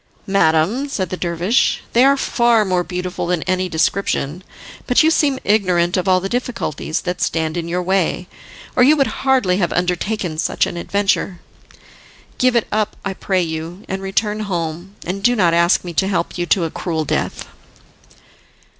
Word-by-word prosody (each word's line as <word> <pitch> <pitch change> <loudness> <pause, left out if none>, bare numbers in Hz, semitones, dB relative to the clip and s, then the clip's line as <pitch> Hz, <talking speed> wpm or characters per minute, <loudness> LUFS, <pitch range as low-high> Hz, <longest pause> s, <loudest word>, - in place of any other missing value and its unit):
"Madam," 195 - +2
said 190 -10 -3
the - - -1
dervish, 180 +7 0
"they 240 - +5
are 275 +1 +5
far 235 -4 +2
more 180 -2 +1
beautiful 180 0 -4
than 175 -2 0
any 185 0 -1
description, 165 -1 -1 0.4
but 250 - +4
you 320 - +4
seem 285 -4 +2
ignorant 180 -4 +2
of 185 0 -1
all 185 -1 +4
the 190 - -3
difficulties 235 - -3
that 180 0 -4
stand 160 -1 -1
in 170 -1 -3
your 180 +1 -1
way, 180 -1 0 0.5
or - - +3
you 290 +5 +6
would 275 - +3 0.2
hardly 255 -9 +2
have 175 -3 0
undertaken 180 -1 -1
such - - +1
an - - -5
adventure. 195 0 -1 1.0
Give 255 -1 +3
it 235 - +2
up, 215 0 0
I 195 - -2
pray 190 -1 0
you, 165 +3 -6
and 190 0 -4
return 210 +2 -1
home, 175 -1 -4
and 190 +3 -3
do 245 +3 +3
not 175 -6 +3
ask 170 +1 +3
me 175 -1 -6
to 190 +4 +1
help 180 -4 -1
you 175 -1 -2
to 180 - +2
a 165 - -2
cruel 160 -3 -3
death." - - -2
185 Hz, 175 wpm, -19 LUFS, 175-215 Hz, 1.0 s, you